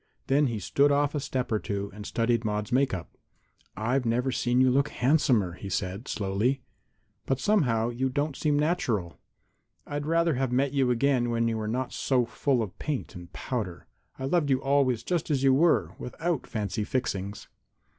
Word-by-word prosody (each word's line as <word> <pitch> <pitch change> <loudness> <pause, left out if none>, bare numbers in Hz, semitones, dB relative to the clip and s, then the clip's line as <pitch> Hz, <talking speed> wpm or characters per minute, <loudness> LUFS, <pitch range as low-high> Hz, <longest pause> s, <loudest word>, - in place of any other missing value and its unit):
Then 140 +2 +3
he 115 -3 -2
stood 140 +8 +2
off 145 0 +2
a 150 - -1
step 130 -3 -3
or 110 - +2
two 100 -1 -4
and 105 0 -8
studied 115 0 +1
Maude's 105 +1 -2
make 135 +2 +3
up. 90 -3 -6 0.6
"I've 125 +5 0
never 125 +3 +1
seen 125 +1 +1
you 130 0 +5
look 140 +3 +2
handsomer," 125 - +2
he 95 +2 -8
said, 95 +5 -3
slowly, 110 +7 0 0.6
"but 135 -1 +1
somehow 120 - +2
you 130 +2 -1
don't 145 +2 -1
seem 150 0 +1
natural. 125 - 0 0.7
I'd 145 0 -4
rather 165 0 +2
have 130 -1 -1
met 135 +2 +1
you 135 -3 +2
again 125 0 +2
when 115 0 +1
you 115 - 0
were 110 -1 -3
not 125 +3 -2
so 125 -3 +1
full 125 +1 0
of 95 -4 -8
paint 150 -4 -3
and 90 -2 -10
powder. 105 -9 -4 0.3
I 130 - -4
loved 150 +1 +1
you 130 -1 +3
always 135 -4 +2
just 175 -3 -1
as 140 -3 +1
you 135 -1 +5
were, 160 +5 +3
without 160 +3 -3
fancy 105 -1 -2
fixings." 100 -4 -3
125 Hz, 185 wpm, -27 LUFS, 110-140 Hz, 0.7 s, you